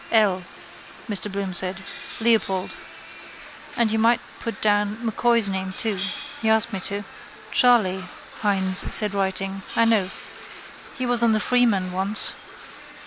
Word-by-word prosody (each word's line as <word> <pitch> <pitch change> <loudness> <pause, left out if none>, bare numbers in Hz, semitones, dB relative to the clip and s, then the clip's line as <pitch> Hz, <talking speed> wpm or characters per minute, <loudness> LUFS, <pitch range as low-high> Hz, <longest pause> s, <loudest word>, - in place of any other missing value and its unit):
—L, 205 -5 +2 0.7
Mr 210 -1 -2
Bloom 195 -1 -4
said. 185 +1 -1 0.4
Leopold. 220 -5 0 1.0
And 230 -2 +1
you 220 - 0
might 230 +1 +3 0.2
put 230 - -6
down 205 0 0
M'Coy's 230 -1 +3
name 190 -1 -4
too. 210 -1 -2 0.4
He 220 - 0
asked 220 +1 +2
me 195 - -3
to. 200 0 -5 0.5
—Charley, 210 -7 +3 0.4
Hynes 190 -3 +3
said 210 -2 +7
writing. 195 0 -3
I 230 - +3
know. 215 -5 +1 0.9
He 255 - -3
was 245 -1 +3
on 230 -1 +3
the 215 - +1
Freeman 215 -6 +1
once. 195 +4 0
205 Hz, 135 wpm, -22 LUFS, 190-225 Hz, 1.0 s, said